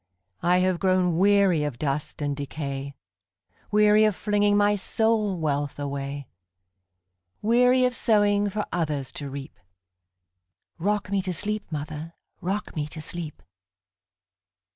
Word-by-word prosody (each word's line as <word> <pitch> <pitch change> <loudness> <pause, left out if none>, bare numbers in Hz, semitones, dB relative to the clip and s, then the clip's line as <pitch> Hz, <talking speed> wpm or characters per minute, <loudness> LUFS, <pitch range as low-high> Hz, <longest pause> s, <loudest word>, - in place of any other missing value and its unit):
I 180 +1 +3
have 185 -1 +1
grown 185 -3 +2
weary 195 -5 +4
of 145 -5 -3
dust 145 +2 -3
and 145 -1 -1
decay,—Weary 140 - -1
of 215 -3 +2
flinging 205 0 +2
my 205 0 +4
soul 215 -1 +1
wealth 145 -2 -1
away; 140 -1 -4 1.2
Weary 250 +3 +4
of 250 0 0
sowing 205 -2 +3
for 210 +1 -2
others 150 -6 -2
to 140 -2 -6
reap;—Rock 90 - -7
me 200 -1 +2
to 185 -1 -3
sleep, 210 0 -3
mother,—rock 160 +6 -5
me 150 -2 -2
to 155 - -8
sleep! 155 -1 -6
165 Hz, 115 wpm, -25 LUFS, 140-205 Hz, 1.2 s, weary